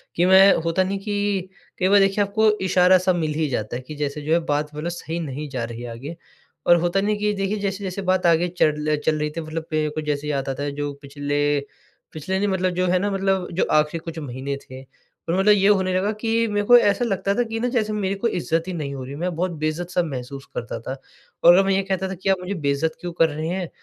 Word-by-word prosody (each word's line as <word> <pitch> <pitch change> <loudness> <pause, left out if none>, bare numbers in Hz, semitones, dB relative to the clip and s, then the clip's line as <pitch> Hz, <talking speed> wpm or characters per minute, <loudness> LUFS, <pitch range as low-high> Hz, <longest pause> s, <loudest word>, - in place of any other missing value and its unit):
कि 175 - +3
मैं 190 +1 +7
होता 165 +3 +2
नहीं 195 +1 -2
कि, 205 -2 -2 0.3
कई 185 - +2
बार 205 +1 +6
देखिए, 195 +1 +3
आपको 215 +2 +2 0.2
इशारा-सा 185 0 +4
मिल 160 -3 -1
ही 155 0 0
जाता 110 -2 -3
है, 125 - -4
कि 150 +4 -9
जैसे 145 0 -3
जो 155 +2 0
है 170 - +4
बात 150 0 0
मतलब 155 +3 -3
सही 170 -1 -5
नहीं 150 -1 -5
जा 130 -3 -3
रही 115 +1 -6
आगे। 140 +8 -7 0.5
और 175 - +8
होता 175 +3 +1
नहीं 210 +1 0
कि 210 0 0
देखिए 195 +1 -1
जैसे-जैसे 195 -1 -3
बात 185 -1 +1
आगे 170 +1 +4
चल 155 -3 +1
चल 160 - +3
रही 150 0 -1
थी 165 - -5
मतलब 160 0 -5
मेरे 155 -1 +1
को 155 +1 -4
जैसे 150 -1 -2
याद 140 -2 -2
आता 135 +1 -3
है, 145 - -2
जो 145 0 -4
पिछले 145 0 -1 0.5
पिछले 175 +5 -3
नहीं 205 - +1
मतलब 185 -2 0
जो 180 +1 0
है 180 +1 +2
ना, 205 +2 -1
मतलब 195 -1 0
जो 180 - +1
आख़िरी 155 +2 +2
कुछ 165 -1 -7
महीने 140 -1 -4
थे 130 -1 -11 0.5
और 175 - +1
मतलब 200 +2 +5
ये 195 -1 +3
होने 190 -3 +3
लगा 195 +3 +1
कि 230 0 +1
मेरे 205 -1 -1
को 245 - +9
ऐसा 205 +1 +2
लगता 200 -2 0
था 245 - +2
कि 225 0 -4
ना 245 - 0
जैसे 215 -4 0
मेरे 195 -2 -1
को 200 +4 -1
इज्ज़त 165 -4 -1
ही 185 - -3
नहीं 145 -5 -4
हो 130 - -6
रही, 135 +2 -7
मैं 175 +3 -3
बहुत 180 +2 -1
बेइज्ज़त-सा 170 +3 -2
महसूस 135 -2 -6
करता 115 -1 -4
था। 115 - -7 0.5
और 170 - +9
अगर 190 +2 +5
मैं 195 - +2
ये 195 - +2
कहता 190 0 -2
था - - -4
कि 190 +2 -3
आप 190 - +4
मुझे 180 +2 -4
बेइज्ज़त 145 +3 0
क्यों 175 - -4
कर 165 -1 +3
रही 155 +2 -4
हैं? 180 -1 -3
175 Hz, 250 wpm, -23 LUFS, 150-195 Hz, 0.5 s, को